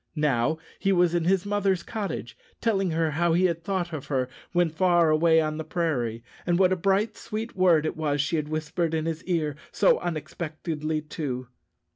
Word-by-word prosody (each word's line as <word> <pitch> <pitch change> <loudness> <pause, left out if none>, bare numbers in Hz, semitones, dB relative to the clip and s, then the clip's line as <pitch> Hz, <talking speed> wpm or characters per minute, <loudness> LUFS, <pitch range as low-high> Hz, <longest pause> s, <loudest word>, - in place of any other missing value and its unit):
Now 150 -1 +1 0.2
he 195 - +1
was 175 -2 +3
in 170 -2 +1
his 190 +1 +2
mother's 200 -3 +1
cottage, 195 - -4 0.2
telling 195 -5 +1
her 160 -1 +1
how 170 +2 +2
he 180 +2 +3
had 170 -2 0
thought 180 -2 -2
of 145 -4 -5
her 130 -3 0 0.2
when 175 -2 +2
far 175 -1 +3
away 160 +1 +4
on 155 -1 -1
the 160 - -3
prairie, 145 -9 -1 0.2
and 175 -1 +1
what 185 0 +4
a - - +2
bright, 195 +4 +1
sweet 220 +2 -5
word 175 -5 +4
it - - -2
was 150 -2 -1
she 145 +4 +1
had 150 -1 -2
whispered 155 +2 -1
in 160 0 -1
his 165 -1 -3
ear 160 -5 0 0.2
so - - +4
unexpectedly, 155 -1 -3
too. 130 -5 -4
165 Hz, 190 wpm, -26 LUFS, 155-180 Hz, 0.2 s, away